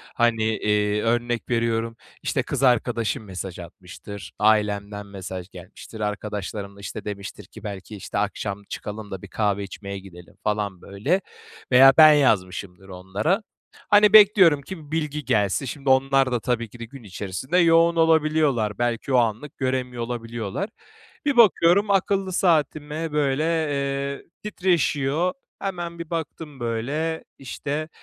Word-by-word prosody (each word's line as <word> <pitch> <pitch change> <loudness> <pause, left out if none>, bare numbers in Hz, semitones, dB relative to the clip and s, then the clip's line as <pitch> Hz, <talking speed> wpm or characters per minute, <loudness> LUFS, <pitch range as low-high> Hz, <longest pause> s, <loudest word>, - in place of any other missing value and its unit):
hani, 120 -2 +2
eee, 105 -1 +1
örnek 120 +1 -1
veriyorum 115 -1 0 0.3
işte - - 0
kız 140 -1 -3
arkadaşım 120 -1 +1
mesaj 95 -2 -7
atmıştır. 90 +3 -10
Ailemden 105 -1 +1
mesaj 95 -2 -7
gelmiştir. 95 +4 -12
Arkadaşlarım 105 -1 -4
da, - - -15
işte, 100 +1 -7
demiştir 100 -1 -7
ki - - -14
belki, 100 +1 -7
işte, 95 - -6
akşam 100 0 -2
çıkalım 105 0 -7
da 95 -1 -6
bir 100 - -9
kahve 100 -1 0
içmeye 100 0 -7
gidelim 90 -2 -14
falan, 105 -4 -2
böyle, 135 - -1 0.5
veya 135 +2 +8
ben 155 -1 +9
yazmışımdır 95 -7 0
onlara. 100 - -1 0.5
Hani, 210 0 +6
bekliyorum 195 -8 +7
ki 155 -1 -10
bilgi 150 -3 -2
gelsin. 105 +6 +1
Şimdi 135 +2 -4
onlar 135 0 +3
da 120 - +1
tabii 120 -2 -2
ki 120 - -14
de 115 - -5
gün 125 +2 -13
içerisinde 100 - -3
yoğun 165 0 +5
olabiliyorlar. 155 -9 +2
Belki 120 +2 -1
o - - +5
anlık 120 +4 -1
göremiyor 130 -2 -2
olabiliyorlar. 115 - -4 0.6
Bir 285 - +1
bakıyorum 200 -2 +5
akıllı 195 -1 +1
saatime 155 -2 0
böyle, 145 0 +1
eee, 140 -4 -1 0.2
titreşiyor. 175 -4 +1 0.3
Hemen 175 -3 -4
bir 170 -1 -7
baktım 160 -3 -5
böyle 140 +8 -2
işte, 145 +4 -4
120 Hz, 135 wpm, -24 LUFS, 105-155 Hz, 0.6 s, ben